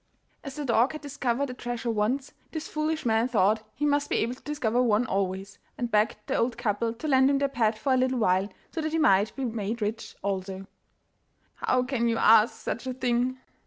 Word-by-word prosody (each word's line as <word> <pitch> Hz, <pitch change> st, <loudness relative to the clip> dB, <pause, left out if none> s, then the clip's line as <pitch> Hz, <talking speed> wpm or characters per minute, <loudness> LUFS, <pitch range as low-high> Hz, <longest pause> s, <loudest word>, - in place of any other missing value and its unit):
As 275 Hz, -2 st, -7 dB
the 295 Hz, -1 st, -4 dB
dog 240 Hz, +2 st, +3 dB
had 305 Hz, -, -7 dB
discovered 275 Hz, -2 st, -2 dB
a -, -, -6 dB
treasure 240 Hz, -1 st, -3 dB
once, 235 Hz, +6 st, -1 dB, 0.2 s
this 315 Hz, -1 st, -4 dB
foolish 310 Hz, 0 st, -2 dB
man 225 Hz, +1 st, +2 dB
thought 215 Hz, -2 st, +2 dB
he 295 Hz, -, -1 dB
must 290 Hz, 0 st, +1 dB
be -, -, 0 dB
able 230 Hz, +2 st, 0 dB
to 255 Hz, -, -15 dB
discover 250 Hz, -5 st, 0 dB
one 230 Hz, -1 st, +3 dB
always, 195 Hz, 0 st, -2 dB, 0.2 s
and 240 Hz, -1 st, -3 dB
begged 210 Hz, +1 st, +3 dB
the -, -, -2 dB
old 235 Hz, 0 st, 0 dB
couple 230 Hz, -1 st, 0 dB
to 235 Hz, +7 st, -6 dB
lend 265 Hz, -2 st, +5 dB
him 280 Hz, -, +3 dB
their 280 Hz, 0 st, +1 dB
pet 230 Hz, -5 st, 0 dB
for 265 Hz, +4 st, +1 dB
a -, -, +3 dB
little 255 Hz, 0 st, +1 dB
while, 190 Hz, -2 st, +2 dB, 0.2 s
so 325 Hz, -, -3 dB
that 310 Hz, 0 st, -3 dB
he -, -, +2 dB
might 200 Hz, -7 st, +3 dB
be 270 Hz, -, -3 dB
made 225 Hz, -1 st, -3 dB
rich 220 Hz, +1 st, -4 dB
also. 190 Hz, -1 st, -3 dB, 0.9 s
'How 255 Hz, 0 st, +1 dB
can 250 Hz, -2 st, 0 dB
you 230 Hz, -1 st, +1 dB
ask 225 Hz, +1 st, +5 dB
such 235 Hz, +4 st, -4 dB
a 255 Hz, -, -3 dB
thing? 250 Hz, 0 st, 0 dB
240 Hz, 215 wpm, -27 LUFS, 215-270 Hz, 0.9 s, lend